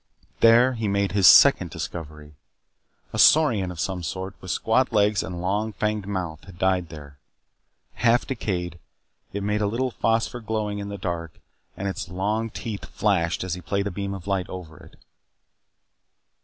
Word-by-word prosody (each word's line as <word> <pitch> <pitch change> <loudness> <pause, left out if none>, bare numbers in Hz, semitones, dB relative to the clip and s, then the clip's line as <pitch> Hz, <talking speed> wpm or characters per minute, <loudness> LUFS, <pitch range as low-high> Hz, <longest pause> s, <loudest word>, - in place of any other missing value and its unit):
There 120 +3 +6
he 115 -3 -3
made 100 0 0
his 100 -1 +5
second - - +7
discovery. 75 -3 -7 0.8
A - - -3
saurian 120 - +5
of 90 -2 -8
some 95 +1 -2
sort, 95 +3 -5
with 95 - -9
squat 115 +8 +1
legs 105 -2 +3
and 90 -2 -6
long, 105 +4 -1
fanged 105 -2 -2
mouth, 90 -6 -4
had 95 -2 -13
died 95 -2 +1
there. 75 -3 -11 0.7
Half 120 0 +2
decayed, 90 - -3 0.5
it 100 0 -4
made 105 +1 0
a 105 - +2
little 125 +5 -1
phosphor 115 +2 0
glowing 110 -2 -3
in 100 0 -5
the 100 - -5
dark 85 -4 -5 0.4
and 100 - -3
its 95 -2 -4
long 105 +5 -1
teeth 105 -1 -6
flashed 85 -7 0
as 95 -2 -3
he 90 - -6
played 100 +4 -2
a 100 - -2
beam 100 +2 -4
of 95 - -9
light 95 -3 -1
over 85 -4 -8
it. - - -16
100 Hz, 170 wpm, -24 LUFS, 90-105 Hz, 0.8 s, second